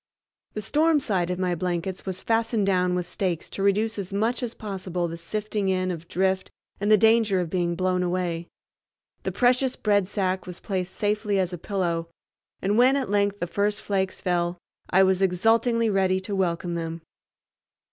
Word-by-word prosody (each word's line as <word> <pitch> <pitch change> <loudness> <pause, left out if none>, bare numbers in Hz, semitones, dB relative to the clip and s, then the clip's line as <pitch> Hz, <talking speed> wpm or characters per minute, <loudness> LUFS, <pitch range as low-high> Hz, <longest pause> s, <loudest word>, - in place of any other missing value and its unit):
The 215 - -3
storm 310 +5 +3
side 185 -9 0
of 180 - -1
my 180 -1 0
blankets 180 +2 -3
was 185 -1 -4
fastened 225 -2 +1
down 180 -2 +2
with 180 -1 -1
stakes 175 -2 -3
to - - -5
reduce 210 +2 +1
as 190 -1 -5
much 220 +6 0
as 240 -2 -3
possible 185 -4 -3
the 165 - -5
sifting 205 +4 -2
in 185 -1 0
of 170 -1 -7
drift 190 +1 0 0.3
and 205 +2 +1
the 215 - +8
danger 220 -2 +4
of 175 -3 -3
being 175 -2 0
blown 185 0 +1
away. 175 -2 -1 0.7
The - - -2
precious 250 +1 +2
bread 205 -3 +2
sack 190 -2 -1
was 180 -1 -7
placed 185 -2 -3
safely 210 -1 0
as 185 -1 0
a - - -3
pillow, 170 -4 -2 0.5
and 205 +4 +2
when 255 +2 +6
at 265 -7 -1
length 205 0 +1
the - - +1
first 205 +4 0
flakes 190 -3 -2
fell 175 -1 0 0.3
I 190 +1 +5
was 190 0 +2
exultingly 225 +5 +3
ready 190 -2 +2
to 200 +2 -3
welcome 175 -2 -1
them. 165 0 -4
190 Hz, 180 wpm, -25 LUFS, 180-210 Hz, 0.7 s, the